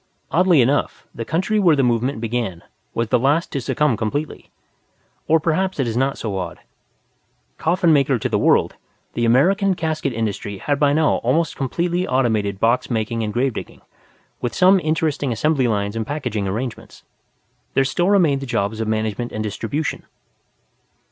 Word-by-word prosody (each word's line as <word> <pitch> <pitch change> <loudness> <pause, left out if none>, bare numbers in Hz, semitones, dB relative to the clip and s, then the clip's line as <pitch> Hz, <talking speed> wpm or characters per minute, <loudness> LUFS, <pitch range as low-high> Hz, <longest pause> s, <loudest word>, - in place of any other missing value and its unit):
Oddly 175 -4 +4
enough, 135 +5 0
the 115 - -5
country 185 - 0
where 175 -6 +5
the 135 - +2
movement 120 0 0
began 115 -7 -3 0.3
was 115 -1 -1
the - - +3
last 145 +6 +1
to 140 - -2
succumb 150 -1 +1
completely. 115 +8 -4 0.8
Or 160 +1 +4
perhaps 180 +3 -1
it 135 - +1
is 115 - -3
not 135 +2 0
so 100 -4 -3
odd. 90 -1 -5 1.0
Coffin 170 0 +2
maker 140 -2 +3
to - - -2
the - - 0
world, - - +2 0.4
the 120 - 0
American 185 - +3
casket 155 -4 -2
industry 105 -3 -3
had 145 +8 -1
by 145 -1 +4
now 155 +1 +2
almost 165 -1 0
completely 175 +6 -1
automated 110 -7 0
box 115 +3 +1
making 115 -1 -1
and 105 -1 -2
gravedigging, 125 +2 -3 0.6
with 120 - -3
some 185 +1 +5
interesting 155 -4 -1
assembly 130 +3 +1
lines 100 -1 -1
and 115 -1 -3
packaging 110 -9 -3
arrangements; 115 +5 -5 0.7
there 135 - +3
still 175 +7 0
remained 165 -9 +3
the 135 - -6
jobs 110 -2 -1
of 110 - -2
management 110 +2 -2
and 110 - -3
distribution. 115 +8 -3
130 Hz, 160 wpm, -21 LUFS, 110-155 Hz, 1.0 s, where